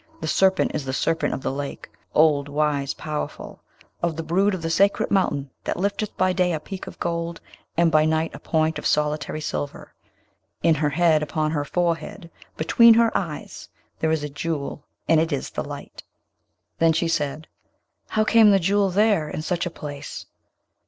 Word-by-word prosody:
the 160 - -4
serpent 190 +3 +3
is 150 - -2
the 130 -1 -4
Serpent 165 +4 0
of - - -4
the - - -1
Lake; 140 +1 -5 0.3
old, 150 -2 +4
wise, 145 -1 0
powerful; 150 -1 -6 0.4
of 170 -2 0
the 165 - -4
brood 190 +5 +2
of 175 - -7
the 165 - -1
sacred 200 +4 +2
mountain, 140 -8 +1
that - - -2
lifteth 200 +3 -2
by 185 0 +2
day 180 -1 +1
a 155 - -1
peak 190 +3 -8
of - - -10
gold, 170 0 -3 0.4
and 170 -1 +4
by 155 -1 +5
night 160 +1 +1
a - - -8
point 160 0 0
of - - -9
solitary 150 0 0
silver. 145 -2 -5 0.7
In 165 - +5
her 150 -1 +1
head, 160 0 +3
upon 155 0 -1
her 145 -2 -1
forehead, 170 +2 -2 0.3
between 230 +8 +6
her 230 -1 +3
eyes, 160 -6 -4 0.3
there 160 - +1
is 160 -2 0
a 150 - -3
Jewel, 145 -1 -4 0.2
and 165 - +5
it 165 +1 0
is 140 - -3
this - - -4
light.' - - -9 0.8
Then 165 0 +4
she 165 +2 0
said, 155 -1 -2 0.6
'How 215 - +1
came 220 0 +6
the 195 -1 +5
Jewel 195 +2 +2
there, 200 -5 +2
in 155 - -5
such 175 +1 -1
a - - -2
place?' 145 -3 -8
160 Hz, 185 wpm, -23 LUFS, 150-180 Hz, 0.8 s, between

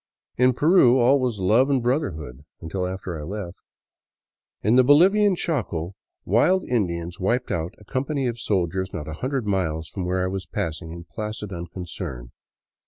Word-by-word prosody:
In 125 +1 +4
Peru 145 -3 +5
all 130 +3 +4
was 125 -4 -1
love 110 +9 +3
and 135 -2 +3
brotherhood 85 - -2
— - - -65
until 90 +3 -3
after 90 -3 -5
I - - -7
left. 95 +1 -6 1.0
In 110 +4 +4
the 130 - +7
Bolivian 190 +9 +5
Chaco 100 - -2 0.3
wild 175 - +3
Indians 85 -7 -1
wiped 120 +7 0
out 85 +2 -2
a 105 - -17
company 135 +4 -2
of 120 -1 -2
soldiers 95 -2 -1
not 75 - -5
a 80 - -5
hundred 130 -2 -1
miles 80 -6 -1
from 95 - -5
where 90 +1 0
I - - 0
was 95 0 -4
passing 80 +1 -4
in 85 0 -8
placid 105 +2 -6
unconcern. 85 -8 -7
100 Hz, 170 wpm, -24 LUFS, 85-125 Hz, 1.0 s, the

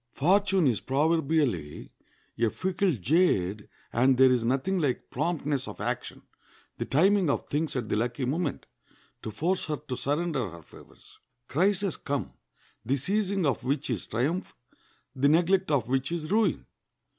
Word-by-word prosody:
Fortune 190 +3 +3
is 120 -6 +1
proverbially 140 - 0 0.5
a 115 -1 +3
fickle 185 - 0
jade, 105 - +1 0.2
and 130 +2 +3
there 130 0 +6
is 125 -2 +2
nothing 135 +11 0
like 140 -6 -2
promptness 145 -2 -1
of - - -8
action, - - -4 0.6
the - - -1
timing 185 +4 +3
of - - 0
things 150 +1 -1
at 120 -4 -2
the - - -1
lucky 120 +4 -1
moment, 150 +3 -2 0.6
to - - -5
force 170 - -1
her 150 -2 -2
to 135 -2 -6
surrender 145 - -1
her 85 -1 -12
favors. - - -17 0.3
Crises 190 +4 +1
come, 130 - -3 0.5
the 130 +5 +1
seizing 195 +5 0
of 135 -4 0
which 135 +1 -1
is 105 -7 -3
triumph, 145 - -2 0.6
the 140 +2 +3
neglect 180 +4 +3
of 135 -7 +1
which 130 +4 -1
is 170 -1 -4
ruin. 210 -5 +1
145 Hz, 150 wpm, -28 LUFS, 125-175 Hz, 0.6 s, there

